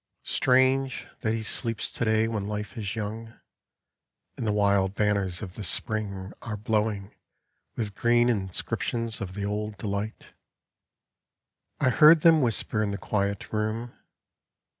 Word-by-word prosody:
Strange 130 +1 +2
that 110 - 0
he 110 - -3
sleeps 115 +1 -1
to - - -2
day 110 0 +3
when 105 -3 -3
Life 105 -1 -4
is 105 -2 -3
young, 110 +2 -5 1.0
And 115 - -3
the - - +2
wild 100 -2 +2
banners 100 -3 0
of 90 -3 -7
the 105 - -6
Spring 100 +1 -3
are 105 -3 -5
blowing 105 -1 -1 0.6
With 105 -3 -3
green 120 +3 +3
inscriptions 110 +2 -2
of 95 -1 -5
the 100 -1 -3
old 105 0 -3
delight." 100 +1 -4 1.5
I 130 - +3
heard 155 +4 +7
them 165 -1 +6
whisper 110 -3 0
in 105 - 0
the 100 - -3
quiet 100 0 -2
room. 110 +3 -2
105 Hz, 140 wpm, -27 LUFS, 100-115 Hz, 1.5 s, heard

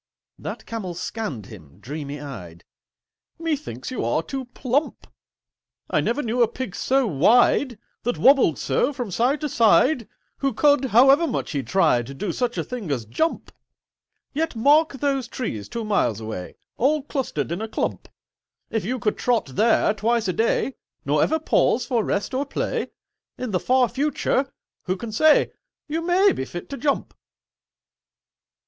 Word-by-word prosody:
That - - -6
Camel 195 -7 -5
scanned 175 - -4
him, 85 -8 -13
dreamy 145 +5 -6
eyed. 90 - -9 0.7
"Methinks 310 -5 -4
you 255 - -3
are 120 +8 0
too 270 +4 -5
plump. 255 +4 -2 0.9
I - - +3
never 275 +5 -1
knew 240 +2 0
a 235 - +6
Pig 235 -4 -6
so 265 0 +2
wide— 230 - +3 0.2
That 245 +1 -1
wobbled 265 - +5
so 290 - 0
from 245 -7 -5
side 250 - +1
to 300 - -1
side— 235 0 +3 0.3
Who 275 -2 0
could, 285 0 +4
however 270 +7 +5
much 260 - -3
he 145 -4 -1
tried, 135 -3 +1
Do 190 +4 -2
such 245 +5 -2
a - - 0
thing 240 -9 -6
as 125 -6 -2
jump! 320 - -2 0.8
"Yet 320 -1 -1
mark 290 +7 +4
those 270 -2 -1
trees, 115 - -5
two 230 -1 -4
miles 200 - +1
away, 110 -5 -6 0.2
All 285 +4 +2
clustered 250 - -3
in 175 +5 -3
a 220 - -3
clump: - - -3 0.6
If 225 - -1
you 245 +7 -2
could 225 -4 -1
trot 235 - +1
there 220 +1 +3
twice 225 +1 0
a 185 - 0
day, 230 +5 0 0.3
Nor - - +2
ever 320 - +2
pause 255 -5 +2
for 240 -2 0
rest 200 +7 -2
or 270 +2 -1
play, - - -2 0.5
In 250 -3 -4
the 180 - +1
far 255 +3 +3
future—Who 270 -8 -2
can 225 +4 -6
say— 305 +8 +4 0.4
You 320 +2 -2
may 360 +4 +4
be - - -3
fit 175 - -8
to 275 - -4
jump." 285 -1 -1
235 Hz, 160 wpm, -23 LUFS, 175-275 Hz, 0.9 s, a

